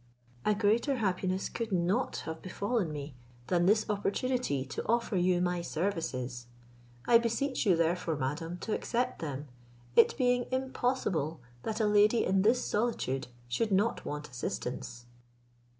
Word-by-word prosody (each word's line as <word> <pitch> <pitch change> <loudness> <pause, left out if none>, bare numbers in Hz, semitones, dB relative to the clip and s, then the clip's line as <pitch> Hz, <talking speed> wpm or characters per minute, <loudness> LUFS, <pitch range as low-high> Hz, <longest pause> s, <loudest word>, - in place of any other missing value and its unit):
A 210 - +3
greater 225 +7 +2
happiness 190 -4 0
could 230 -2 -4
not 185 +7 0
have 160 0 -5
befallen 200 -1 -1
me 145 -1 -6 0.3
than 175 +2 +2
this 215 +2 +4
opportunity 205 - 0
to 135 - -5
offer 235 -2 +1
you 180 0 +3
my 180 -1 0
services. 155 -9 -3 0.6
I 235 -1 +7
beseech 235 +2 -1
you, 185 - +6
therefore, 170 0 +1
madam, 150 +5 -3
to 220 - -2
accept 245 +1 -1
them, 145 -2 -4 0.5
it - - +6
being 245 -2 +2
impossible 245 - -1 0.2
that 220 - -3
a 220 - +3
lady 210 +2 +4
in 190 0 +3
this 230 +5 +3
solitude 170 - -1 0.2
should 200 - 0
not 205 +4 +2
want 150 0 -5
assistance." 120 0 -5
190 Hz, 140 wpm, -31 LUFS, 160-230 Hz, 0.6 s, I